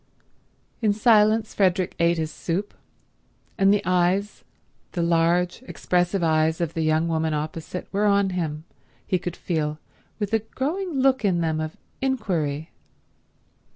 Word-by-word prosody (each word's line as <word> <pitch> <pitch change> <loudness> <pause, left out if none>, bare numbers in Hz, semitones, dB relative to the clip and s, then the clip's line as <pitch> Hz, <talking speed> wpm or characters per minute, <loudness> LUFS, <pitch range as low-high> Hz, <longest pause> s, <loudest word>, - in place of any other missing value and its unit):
In 215 -2 +3
silence 215 0 +4
Frederick 185 -2 +1
ate 170 0 +3
his 160 -1 -2
soup, 190 +5 -3 0.8
and 195 0 +4
the 205 - +2
eyes, 185 +3 +1 0.5
the 170 - 0
large 170 +3 +2
expressive 180 +1 0
eyes 160 0 +2
of 170 -2 -2
the 165 - -2
young 155 +1 +2
woman 160 -1 0
opposite, 155 +4 -5
were 205 +2 +1
on 200 -1 +3
him, 160 -4 -3 0.4
he 185 -3 0
could 175 0 -5
feel, 155 -3 -2 0.4
with 205 0 -3
a 225 - +4
growing 310 - -3
look 265 -2 +3
in 180 -4 +2
them 160 -1 0
of 155 0 -4 0.2
inquiry. 175 - -1
180 Hz, 140 wpm, -24 LUFS, 160-205 Hz, 0.8 s, silence